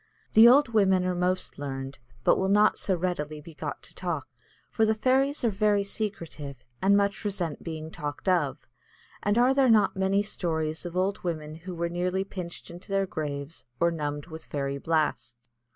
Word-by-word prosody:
The 225 Hz, +2 st, +9 dB
old 265 Hz, +2 st, +6 dB
women 190 Hz, -4 st, +3 dB
are 185 Hz, -, +1 dB
most 180 Hz, -1 st, -1 dB
learned, 135 Hz, -2 st, -5 dB, 0.2 s
but -, -, +5 dB
will 190 Hz, -, +1 dB
not 210 Hz, +1 st, +4 dB
so 190 Hz, -, +1 dB
readily 160 Hz, -4 st, -2 dB
be 160 Hz, +2 st, -12 dB
got -, -, -6 dB
to -, -, -15 dB
talk, -, -, -3 dB, 0.4 s
for 225 Hz, -, +1 dB
the 220 Hz, 0 st, +3 dB
fairies 265 Hz, +5 st, +2 dB
are 230 Hz, -, +3 dB
very 205 Hz, 0 st, +2 dB
secretive, 170 Hz, -9 st, -4 dB, 0.3 s
and 200 Hz, +1 st, +5 dB
much 200 Hz, -1 st, 0 dB
resent 185 Hz, -7 st, -3 dB
being 160 Hz, -1 st, -6 dB
talked 145 Hz, +3 st, -6 dB
of; 170 Hz, -7 st, +1 dB, 0.6 s
and 205 Hz, +2 st, +1 dB
are 250 Hz, +2 st, +5 dB
there 270 Hz, -2 st, +4 dB
not 215 Hz, -3 st, +4 dB
many 190 Hz, +1 st, +2 dB
stories 160 Hz, -4 st, -2 dB
of 175 Hz, +1 st, -6 dB
old 190 Hz, +2 st, 0 dB
women 155 Hz, -3 st, -3 dB
who 175 Hz, +3 st, -8 dB
were 170 Hz, 0 st, -1 dB
nearly 180 Hz, +2 st, -1 dB
pinched 180 Hz, -4 st, -7 dB
into 175 Hz, +4 st, -12 dB
their 195 Hz, 0 st, +2 dB
graves 145 Hz, -4 st, -5 dB
or 170 Hz, 0 st, +3 dB
numbed 145 Hz, -3 st, -3 dB
with 160 Hz, -1 st, -9 dB
fairy 140 Hz, -1 st, -3 dB
blasts? 145 Hz, -7 st, 0 dB
180 Hz, 185 wpm, -27 LUFS, 155-200 Hz, 0.6 s, The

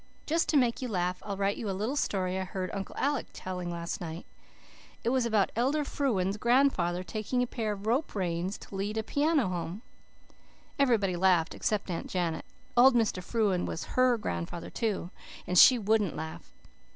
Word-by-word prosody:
"Just 330 Hz, +2 st, +1 dB
to 305 Hz, -, +4 dB
make 245 Hz, -2 st, +2 dB
you 255 Hz, -, -2 dB
laugh 180 Hz, -4 st, -1 dB
I'll 200 Hz, -2 st, -4 dB
write 200 Hz, +1 st, 0 dB
you 215 Hz, -, -4 dB
a 190 Hz, -, -2 dB
little 220 Hz, +8 st, -1 dB
story 190 Hz, -8 st, -1 dB
I -, -, -1 dB
heard 185 Hz, 0 st, -4 dB
Uncle 195 Hz, -1 st, -5 dB
Alec 285 Hz, -1 st, 0 dB
telling 180 Hz, -1 st, -5 dB
last 170 Hz, +2 st, -4 dB
night. 165 Hz, 0 st, -6 dB, 0.8 s
It 230 Hz, -, +1 dB
was 255 Hz, -1 st, +2 dB
about 215 Hz, -4 st, +2 dB
Elder 270 Hz, +6 st, +1 dB
Frewen's 205 Hz, -10 st, 0 dB
grandfather 225 Hz, -8 st, +2 dB
taking 220 Hz, +5 st, -1 dB
a -, -, +1 dB
pair 225 Hz, -3 st, -3 dB
of 200 Hz, 0 st, -9 dB
rope 245 Hz, +6 st, 0 dB
reins 180 Hz, 0 st, -2 dB
to -, -, -14 dB
lead 200 Hz, +3 st, -2 dB
a 220 Hz, -, 0 dB
piano 290 Hz, -, +2 dB
home. 180 Hz, +4 st, -4 dB, 1.0 s
Everybody 220 Hz, -9 st, +3 dB
laughed 175 Hz, -2 st, +3 dB
except 205 Hz, -3 st, -1 dB
Aunt 170 Hz, -, -4 dB
Janet. 175 Hz, -3 st, -2 dB, 0.3 s
Old 250 Hz, +1 st, +7 dB
Mr. 220 Hz, -5 st, +1 dB
Frewen 200 Hz, -4 st, 0 dB
was 165 Hz, -, -4 dB
HER 255 Hz, -1 st, +4 dB
grandfather 85 Hz, -, -4 dB
too, 205 Hz, -6 st, -2 dB, 0.3 s
and 180 Hz, -, -2 dB
she 250 Hz, +7 st, +9 dB
wouldn't 215 Hz, -4 st, +1 dB
laugh. 160 Hz, 0 st, -7 dB
205 Hz, 180 wpm, -29 LUFS, 180-240 Hz, 1.0 s, she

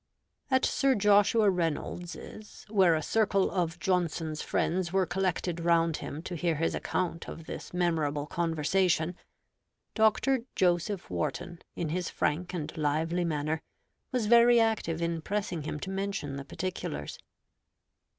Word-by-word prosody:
At 260 Hz, -1 st, +3 dB
Sir 270 Hz, -1 st, +2 dB
Joshua 205 Hz, +1 st, +4 dB
Reynolds's, 175 Hz, +4 st, -4 dB
where 190 Hz, -6 st, +4 dB
a 155 Hz, -, -1 dB
circle 200 Hz, -1 st, +2 dB
of 170 Hz, -3 st, -1 dB
Johnson's 165 Hz, -4 st, -1 dB
friends 175 Hz, 0 st, 0 dB
were 190 Hz, 0 st, +2 dB
collected 175 Hz, -1 st, -1 dB
round 165 Hz, -1 st, +2 dB
him 155 Hz, +3 st, -6 dB
to 180 Hz, -, -6 dB
hear 170 Hz, 0 st, 0 dB
his 165 Hz, +2 st, 0 dB
account 170 Hz, -2 st, -2 dB
of 165 Hz, -, -8 dB
this -, -, -7 dB
memorable 160 Hz, -5 st, 0 dB
conversation, 170 Hz, +1 st, +1 dB, 0.8 s
Dr. 220 Hz, +5 st, +3 dB, 0.2 s
Joseph 175 Hz, -, +1 dB
Warton, 175 Hz, -, -3 dB, 0.2 s
in 165 Hz, -, -2 dB
his 175 Hz, +2 st, -2 dB
frank 170 Hz, +4 st, -1 dB
and 160 Hz, -4 st, -5 dB
lively 160 Hz, +3 st, 0 dB
manner, 155 Hz, 0 st, -1 dB, 0.5 s
was 250 Hz, -4 st, 0 dB
very 235 Hz, +2 st, +6 dB
active 205 Hz, -8 st, +1 dB
in 170 Hz, -1 st, -1 dB
pressing 195 Hz, -2 st, -2 dB
him 150 Hz, -, -4 dB
to 190 Hz, -, -4 dB
mention 195 Hz, -8 st, -3 dB
the 140 Hz, 0 st, -6 dB
particulars. 135 Hz, -, -5 dB
175 Hz, 135 wpm, -29 LUFS, 160-195 Hz, 0.8 s, very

